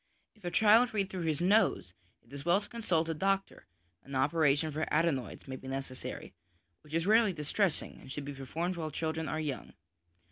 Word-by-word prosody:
If 215 - -26
a 175 - -2
child 220 +4 +5
read 195 -2 0
through 180 -3 -3
his 155 -1 0
nose, 185 - +3 0.3
it 115 +4 -19
is 140 -1 -6
well 175 +3 +4
to 205 - -10
consult 180 -9 0
a 165 - 0
doctor; 195 +4 -1 0.4
an 140 - -8
operation 145 +2 +2
for 155 +2 -3
adenoids 155 -8 0
may 130 0 -5
be 130 - -11
necessary, 135 -1 -5 0.5
which 150 +1 -7
is 165 0 +1
rarely 215 -1 +5
distressing, 160 +3 -1
and 130 - -11
should 145 0 -5
be 145 - -5
performed 165 +7 -3
while 160 -2 -3
children 160 +1 -2
are 155 - -2
young. 150 -4 -4
160 Hz, 190 wpm, -32 LUFS, 140-190 Hz, 0.5 s, child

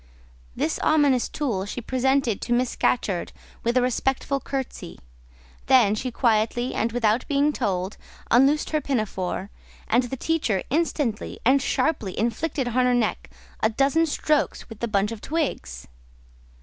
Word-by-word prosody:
This 160 - -1
ominous 285 -5 +3
tool 220 -10 -2
she 225 - -5
presented 260 -2 0
to 240 - -1
Miss 245 0 +1
Scatcherd 195 -8 0 0.3
with 235 +2 +1
a 250 - +4
respectful 265 +2 0
curtesy; 265 -10 -5 0.7
then 240 -6 +5
she 255 +4 -2
quietly, 235 +1 +1
and 230 - 0
without 230 0 +1
being 290 +1 +2
told, 190 -3 -2 0.3
unloosed 275 +5 +4
her 305 -1 +1
pinafore, 205 -7 -2 0.4
and 240 - +3
the 265 +2 -5
teacher 250 - 0
instantly 290 -7 -1
and 270 +3 +5
sharply 255 - -1
inflicted 245 +4 -1
on - - -6
her 250 0 +3
neck 235 -3 -1 0.3
a 220 - +2
dozen 275 +8 +2
strokes 300 0 0
with 225 -2 -10
the 235 - -1
bunch 205 -1 +1
of 225 -2 -7
twigs. 275 - -3
245 Hz, 145 wpm, -24 LUFS, 215-275 Hz, 0.7 s, then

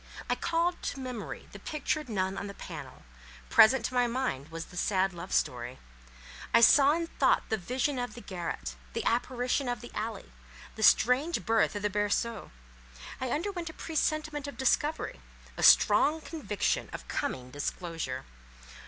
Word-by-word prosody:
I - - +2
called 340 +1 +1
up - - -24
to 275 - -3
memory 250 -4 -6
the - - -10
pictured 305 -1 -2
nun 190 -3 -1
on 205 - -4
the 200 - -8
panel; - - -9 0.5
present 255 +4 +6
to - - -3
my 245 -1 +3
mind 235 - -2
was 165 0 -6
the 180 - -15
sad 190 +1 +1
love 175 +2 -8
story; 125 +1 -1 0.8
I 230 - +7
saw 280 +4 +7
in 335 +1 -1
thought - - +2
the 220 - +1
vision 255 +7 -1
of 245 0 -4
the 240 - -9
garret, 170 - -5 0.2
the - - -3
apparition 250 +2 0
of 245 -1 -2
the 240 - -10
alley, 220 +1 -5 0.4
the 220 - -7
strange 255 +9 +4
birth 225 -2 +2
of 205 - -4
the 210 - +2
berceau; 205 +2 -1 0.7
I 260 - -1
underwent 345 +3 -2
a - - -9
presentiment 310 -2 -2
of 285 - -8
discovery, 295 +4 0 0.3
a - - -5
strong 310 +2 +6
conviction 300 -10 -2
of - - -8
coming 125 0 -3
disclosure. 145 -2 -4
240 Hz, 165 wpm, -30 LUFS, 190-290 Hz, 0.8 s, I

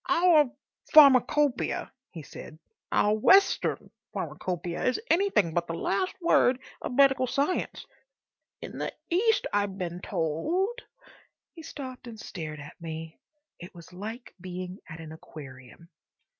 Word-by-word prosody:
"Our 330 -6 +5 0.4
Pharmacopoeia," 285 -1 +5 0.2
he 165 -4 -9
said, 155 +2 -11 0.3
"our 210 - +3
Western 385 - +3 0.2
Pharmacopoeia, 175 -1 -3
is 255 - +1
anything 335 - +3
but 170 0 0
the 165 - -3
last 370 - -1
word 265 -7 +4 0.2
of - - -4
medical 270 -1 +5
science. 280 +8 -1 0.8
In - - -7
the - - -2 0.2
East, 435 +6 +3
I've 205 -1 0
been 175 -2 -4
told—" 270 - -1 0.7
He 330 - -11
stopped 260 -5 -8
and 225 -2 -9
stared 155 -7 -7
at 150 +4 -12
me. 160 0 -7 0.4
It 175 +1 -11
was 170 +1 -13
like 220 +6 -7
being 185 +1 -6
at 160 0 -8
an 160 -1 -9
aquarium. 140 -1 -12
205 Hz, 130 wpm, -28 LUFS, -, 0.8 s, Our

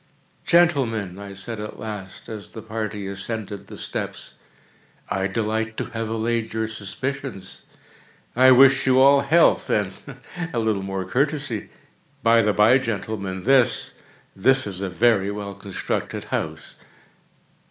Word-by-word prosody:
"Gentlemen," 120 - +2
I 100 -1 -8
said 105 +3 -6
at 105 0 -6
last, 105 -4 -7
as 110 -3 -7
the 110 - -9
party 105 -2 -4
ascended 100 +1 -5
the - - -10
steps, - - -5 0.8
"I 95 0 0
delight 110 +2 -2
to - - -4
have 115 -1 -3
allayed 115 0 -1
your 110 0 -1
suspicions. 110 0 -6 0.7
I 130 +1 +7
wish 135 +1 +6
you 130 0 +5
all 140 +1 +6
health, 160 +5 +3
and 100 -2 +1 0.6
a 125 - -4
little 110 -3 +1
more 95 -1 -3
courtesy. 140 -4 -1 0.5
By 115 0 +5
the 105 -1 +2
bye, 110 +6 +5
gentlemen, 100 -5 -4
this—this 130 -1 +1
is 95 -2 -5
a 100 - -2
very 100 0 +2
well 100 -1 -5
constructed 100 0 -4
house." 80 0 -3
110 Hz, 130 wpm, -23 LUFS, 100-125 Hz, 0.8 s, I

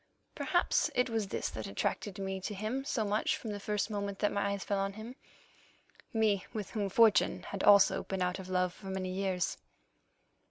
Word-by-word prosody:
Perhaps - - +1
it 250 -1 +2
was 220 -3 0
this - - -2
that 110 - -6
attracted 190 - -2
me 190 -1 -3
to 205 +2 -4
him 220 +7 -2
so 260 -6 -1
much 210 +1 +1
from 220 - -6
the 205 - -4
first 210 +1 -1
moment 200 -1 -3
that 205 - +1
my 200 0 0
eyes 200 - -4
fell 200 -1 -1
on 195 0 -1
him—me 220 -2 -5
with 215 -4 -4
whom 205 -3 -1
fortune 220 +2 +4
had 200 - -5
also 200 -1 +6
been 190 -1 -2
out 180 +1 -1
of 185 -1 -8
love 180 -1 +1
for 195 - -12
many 190 -1 -3
years. 185 -2 -1
200 Hz, 190 wpm, -32 LUFS, 190-215 Hz, -, also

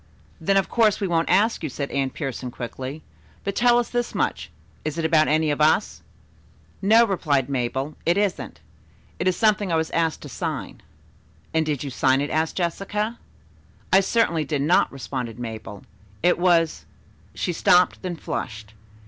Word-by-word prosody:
"Then, 195 +5 +2
of 195 - +2
course, 220 -3 +2
we 200 - -1
won't 165 -2 0
ask 205 +6 +3
you," 155 - -3
said 140 +2 -5
Anne 135 -1 0
Pierson 130 -3 -5
quickly. 130 +5 -7 0.4
"But 200 0 -3
tell 240 0 +4
us 240 - -1
this 240 0 -2
much - - -1 0.3
is 155 +1 -3
it 165 - -1
about 155 -1 +4
any 155 0 +2
of 145 - -2
us?" 155 +7 +2 0.8
"No," 220 +4 +6
replied 150 - 0
Mabel. 135 +2 -2
"It 170 +3 +2
isn't. 205 -3 -2 0.6
It 180 - 0
is 180 -1 +2
something 210 -4 +2
I - - +2
was 160 0 -1
asked 165 -1 0
to - - -7
sign." - - -5 0.7
"And 160 -1 +1
did 150 -3 -1
you 140 - -5
sign 130 +1 +2
it?" 145 +1 -2
asked 160 +1 0
Jessica. 210 +6 -2 0.7
"I 190 - +8
certainly 195 -5 +1
did 145 -1 -1
not," 170 +5 +3
responded 125 -4 -5
Mabel. 110 -4 -7 0.4
"It 175 0 +3
was 170 -3 +2 0.2
" - - -30
she 175 - -2
stopped, 180 +2 +3
then 180 -2 -4
flushed. 110 -8 -6
160 Hz, 175 wpm, -23 LUFS, 140-195 Hz, 0.8 s, I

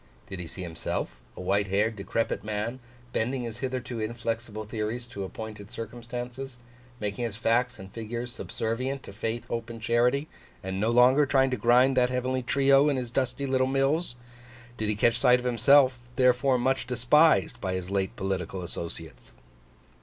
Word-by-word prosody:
Did 95 - -7
he 90 - -5
see 95 - -7
himself, 80 -7 -4 0.2
a - - -6
white 100 +2 +1
haired 105 +4 +1
decrepit 100 0 -2
man, 110 +4 -3 0.3
bending 125 +3 0
his 115 -1 -6
hitherto 125 -2 -3
inflexible 115 -1 -3
theories 110 +2 -3
to 120 -5 -6
appointed 105 +1 -7
circumstances; 120 +3 -6 0.4
making 105 +2 -3
his 110 -3 -3
facts 120 +2 +1
and 95 -1 -10
figures 120 +2 -5
subservient 130 +4 -3
to - - -10
Faith, 115 +3 -3
Hope, 115 0 -4
and 115 -1 -7
Charity; 120 +6 +2 0.4
and 95 0 -3
no 110 +3 +1
longer 125 +5 +5
trying 135 -1 +3
to - - +1
grind 125 +4 +4
that 125 -1 +4
Heavenly 130 +1 -1
trio 140 +3 +4
in 140 - +1
his 125 -2 -3
dusty 130 +2 -1
little 130 -1 +2
mills? 135 +2 +1 0.6
Did 110 -3 -1
he 105 - +1
catch 115 +3 +3
sight 125 -2 +6
of 125 - -7
himself, 130 +2 +5 0.2
therefore 125 +1 +4
much 130 0 0
despised 125 +1 +3
by 95 -2 -1
his 95 0 -5
late 95 -1 -1
political 95 -1 -3
associates? 85 -3 -7
120 Hz, 170 wpm, -27 LUFS, 105-130 Hz, 0.6 s, sight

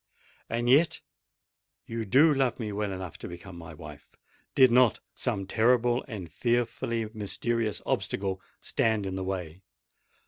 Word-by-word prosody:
And 120 +1 -1
yet 145 +7 +4 0.9
you 115 -1 -4
do 145 +9 +6
love 135 -3 +1
me 110 -3 -3
well 105 0 -2
enough 95 -3 -6
to - - -6
become 90 +2 -9
my 85 -1 -9
wife—did 130 -3 -1
not 125 -2 +5
some 105 -6 -2
terrible 120 +3 +3
and 95 - -7
fearfully 115 +2 0
mysterious 110 0 -2
obstacle 95 -1 -1 0.2
stand 110 -3 +1
in 95 - -3
the 95 - -3
way. 90 -2 -4
110 Hz, 135 wpm, -28 LUFS, 95-120 Hz, 0.9 s, do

